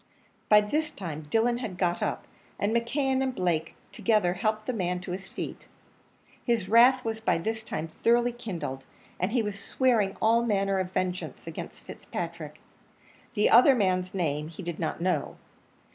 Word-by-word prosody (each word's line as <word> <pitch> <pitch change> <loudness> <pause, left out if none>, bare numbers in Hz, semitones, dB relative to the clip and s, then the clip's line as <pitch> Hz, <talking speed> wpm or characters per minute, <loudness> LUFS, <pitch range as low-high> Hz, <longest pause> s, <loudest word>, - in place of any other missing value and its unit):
By 210 0 +8
this 300 +9 -1
time 155 - -7
Dillon 235 +4 +2
had 215 -8 -5
got 175 -2 0
up; - - -2 0.3
and 210 +3 0
McKeon 265 +3 +1
and 260 -1 -1
Blake 165 -3 -1 0.2
together 210 -6 +2
helped 215 +3 -1
the - - -1
other 235 - -5
man 180 0 0
to 180 - -6
his 190 +1 -5
feet; - - -7 0.8
his 230 -6 0
wrath 245 +4 +6
was 225 -1 -2
by 220 -6 +1
this 220 +6 -3
time 160 -6 -4
thoroughly 235 +8 +2
kindled, 175 - -5 0.4
and 185 +3 0
he 240 -1 +2
was 205 -1 -4
swearing 225 -5 +1
all 230 +2 +4
manner 195 -4 +1
of 185 -1 -2
vengeance 185 -1 -3
against - - -8
Fitzpatrick - - -6 0.8
the 210 - +3
other 255 +3 +8
man's 185 -3 0
name 150 -4 -1
he 165 +4 -9
did 170 -1 -5
not 160 0 -2
know. 185 +1 -1
205 Hz, 170 wpm, -28 LUFS, 180-235 Hz, 0.8 s, By